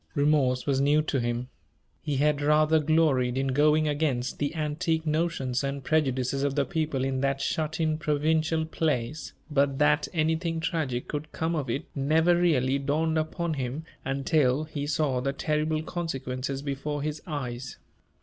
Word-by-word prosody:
Remorse 145 -4 +2
was 135 -2 +1
new 145 +2 +4
to 140 -3 -1
him. 120 +1 -2 0.5
He 145 -3 -2
had 145 +1 +2
rather 155 +2 +4
gloried 145 -5 +2
in 135 0 0
going 150 +3 +3
against 145 -4 -1
the 145 +2 -1
antique 160 +1 -1
notions 155 -5 0
and 140 0 -3
prejudices 135 -3 +1
of 140 -1 0
the 140 -1 +2
people 155 -6 -1
in 130 -1 -1
that 135 0 0
shut 155 +2 -2
in, 155 -1 +1
provincial 160 +1 +1
place; 155 -3 -2 0.2
but 140 -1 +2
that 150 +1 +3
anything 160 0 0
tragic 150 -7 -2
could 150 +1 -5
come 160 +1 -1
of 140 -5 -2
it 140 +7 -2
never 160 +5 +3
really 140 -6 +2
dawned 155 +3 +1
upon 160 +1 -2
him 135 +2 -3 0.2
until 135 0 +1
he 145 -2 -5
saw 145 -4 0
the 135 +2 -1
terrible 155 +2 -1
consequences 135 -5 -4
before 145 +1 -3
his 150 0 -3
eyes. 125 -5 -5
150 Hz, 160 wpm, -27 LUFS, 135-155 Hz, 0.5 s, new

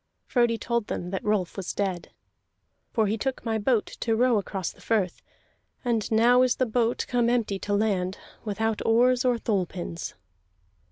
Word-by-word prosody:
Frodi 240 -2 +2
told 235 -1 -1
them 180 0 -4
that 190 - -3
Rolf 210 -4 0
was 195 -2 -4
dead. 190 -4 -2 0.8
"For 220 - +2
he 215 +2 -1
took 265 +1 -3
my 220 -1 0
boat 220 0 +2
to 225 -1 -2
row 240 -1 +3
across 190 -2 -4
the - - -20
firth, 205 -6 0 0.6
and 230 -4 0
now 240 +3 +5
is 255 -1 +3
the 255 - +1
boat 235 0 0
come 240 -1 +2
empty 225 -5 0
to 205 - -2
land, 195 -3 0 0.3
without 220 +1 -1
oars 245 +3 +4
or 250 -2 +2
thole 200 -5 0
pins." 170 -1 -6
220 Hz, 170 wpm, -26 LUFS, 200-240 Hz, 0.8 s, now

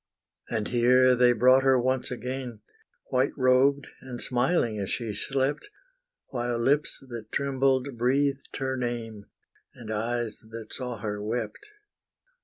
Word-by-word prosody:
And 110 -3 -2
here 125 +1 +5
they 125 0 +5
brought 130 +3 +5
her 135 -1 +4
once 130 +1 0
again, 125 -2 -5 0.5
White 130 +1 +2
robed, 130 +2 +3 0.2
and 125 -2 -7
smiling 120 -3 +1
as 100 - -3
she 115 -3 -2
slept; 135 - -1 0.6
While 120 -2 -2
lips, 140 +5 0
that 115 -2 -8
trembled, 135 -1 +1
breathed 135 +3 0
her 130 0 -2
name, 115 -4 -4 0.5
And 110 -2 -6
eyes 115 +1 -2
that 110 -1 -8
saw 125 -3 -4
her 105 -1 -4
wept. 120 - -4
125 Hz, 130 wpm, -27 LUFS, 115-130 Hz, 0.6 s, here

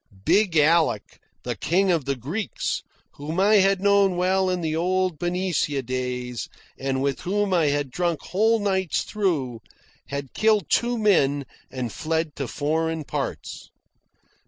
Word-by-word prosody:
Big 195 -5 +3
Alec, 155 -7 +2 0.2
the - - -3
King 185 +4 +1
of 165 -6 0
the 140 0 -1
Greeks, 160 - -3 0.4
whom 155 +5 -4
I 210 +2 +5
had 195 0 +4
known 200 -1 +3
well 185 +1 +2
in 180 -1 -1
the 160 -1 -1
old 185 0 0
Benicia 175 -6 -1
days, 125 -1 -4 0.3
and 135 0 -2
with 140 -1 -1
whom 200 +1 0
I 165 -4 +3
had 145 -2 -1
drunk 170 0 -1
whole 220 +4 +2
nights 190 -4 0
through, 150 - -1 0.5
had 140 -2 -5
killed 215 -4 +3
two 240 0 +2
men 145 -10 +2 0.2
and 125 -4 -4
fled 160 -1 -2
to 135 - -3
foreign 160 +4 -1
parts. - - -5
165 Hz, 145 wpm, -24 LUFS, 140-190 Hz, 0.5 s, I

